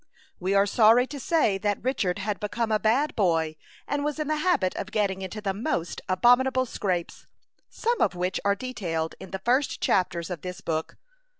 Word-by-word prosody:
We 190 +2 0
are 200 0 +5
sorry 225 +4 +5
to 285 +2 -8
say 240 - +2
that 205 0 -1
Richard 235 -9 0
had 205 +1 -3
become 220 +2 -2
a 215 - +3
bad 250 +8 +1
boy, 165 -6 +1 0.3
and 285 0 -1
was 295 0 -2
in 305 -2 -2
the 310 - +1
habit 300 - +1
of 195 - -4
getting 200 -3 0
into 190 +3 -6
the 195 -2 -1
most 175 -4 -2
abominable 255 +6 +4
scrapes, 185 -7 -3 0.4
some 470 0 -1
of - - +2
which 180 +1 -1
are 200 0 +2
detailed 175 -9 -3
in 190 - -9
the 190 - -4
first 260 +4 +1
chapters 180 -2 0
of 170 -4 -5
this 180 -1 -6
book. 160 -1 -3
205 Hz, 190 wpm, -26 LUFS, 185-255 Hz, 0.4 s, are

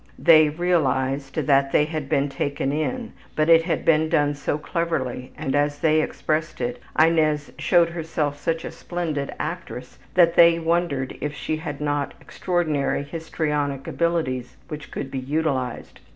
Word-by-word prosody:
'' - - -28
They 155 -3 +6
realized 140 -5 0
that 135 -1 +2
they 150 - +4
had 155 -3 -5
been 145 -2 +2
taken 140 0 -2
in, 190 - -2 0.2
but 155 +1 +1
it 165 0 +8
had 170 - -1
been 160 0 +3
done 145 -1 +2
so 145 0 -2
cleverly, 150 -7 -3
and, 145 -3 -2
as 145 0 +1
they 155 +1 +3
expressed 155 +1 -2
it, 120 0 -3 0.2
Inez 155 -2 +3
showed 170 -2 +4
herself 160 -3 -2
such 165 +2 -2
a - - -5
splendid 160 -6 -4
actress, 155 -6 -6 0.2
that 170 -2 +5
they 170 0 +7
wondered 165 -5 -1
if 150 -1 -3
she 155 +2 -3
had 150 -3 -6
not 145 -1 -2
extraordinary 155 -6 -1
histrionic 150 -3 -2
abilities 130 -8 -1
which 150 -2 -7
could 135 - -5
be 135 - -3
utilized. 135 -3 -2
150 Hz, 155 wpm, -23 LUFS, 140-165 Hz, 0.2 s, it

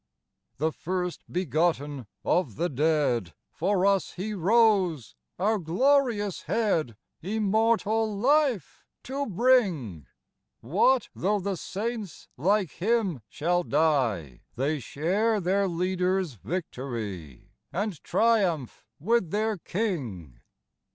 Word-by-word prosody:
The 160 +3 0
First 180 +2 -3
begotten 155 - 0 0.2
of 155 - +1
the 170 +4 -1
dead, 135 - +1 0.2
For 190 +2 +1
us 195 -2 +2
He 210 +4 -4
rose, 190 - +2 0.2
our 210 +4 +1
glorious 215 - +1
Head, 165 - 0 0.2
Immortal 220 +2 +1
life 265 - +1 0.2
to 275 +2 -3
bring; 180 - +1 0.5
What 215 - +2
though 205 +3 0
the 195 0 -2
saints 210 +1 -5
like 190 +4 +1
Him 195 - 0
shall 175 +3 0
die? 125 - 0
They 145 +4 0
share 195 - 0
their 195 +2 +1
Leader's 180 -1 0
victory, 115 - -6 0.2
And 200 -3 -3
triumph 195 - +1
with 210 +2 +1
their 215 +3 0
King. 125 - -4
180 Hz, 100 wpm, -27 LUFS, 150-215 Hz, 0.5 s, us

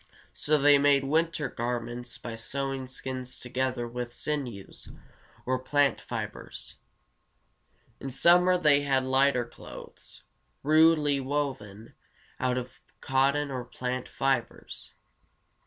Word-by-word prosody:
So 155 0 +2
they 145 0 +6
made 140 -1 +4
winter 160 +1 +1
garments 120 0 -4
by 115 - -7
sewing 135 +3 -3
skins 130 0 -5
together 125 -1 -2
with 120 0 -5
sinews 125 -8 -5 0.6
or 130 0 0
plant 140 0 +2
fibers. - - -6 1.2
In 135 - -5
summer 180 +7 +5
they 150 -4 +4
had 135 -2 +1
lighter 130 -1 +3
clothes, - - -12 0.4
rudely 155 -1 +5
woven 130 -7 -3 0.5
out 125 0 +1
of 125 0 -6 0.2
cotton 140 +2 +1
or 130 -2 -3
plant 125 +1 -4
fibers. 135 -3 -2
130 Hz, 105 wpm, -28 LUFS, 125-145 Hz, 1.2 s, they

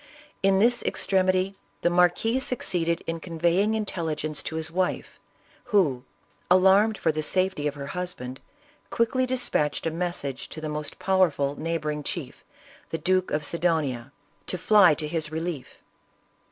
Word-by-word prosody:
In 195 0 +4
this 240 +4 +3
extremity 185 0 +1 0.3
the - - +4
marquis 180 +8 +3
succeeded 175 -10 0
in 165 0 -3
conveying 175 +5 +1
intelli 180 -7 -2
gence 155 0 -3
to 160 - -4
his 160 0 -3
wife, 185 +1 -2 0.5
who, 155 - +1 0.4
alarmed 190 +4 +5
for 160 - +1
the 155 0 -2
safety 185 -1 +1
of 145 - -3
her 140 -1 -6
husband, 145 -5 -5 0.5
quickly 255 +3 +1
dispatched 245 - -1
a 165 - 0
message 160 -6 -3
to - - -8
the 155 -1 -4
most 150 -1 -4
powerful 175 -7 +2
neighboring 155 -2 -2
chief, - - -5 0.5
the 165 - -2
Duke 185 +3 +1
of 150 0 -1
Sidonia, 150 -7 -1 0.4
to 185 - 0
fly 185 -3 +5
to 150 0 -3
his 155 -1 -2
relief. 160 -3 -5
170 Hz, 145 wpm, -26 LUFS, 150-190 Hz, 0.5 s, alarmed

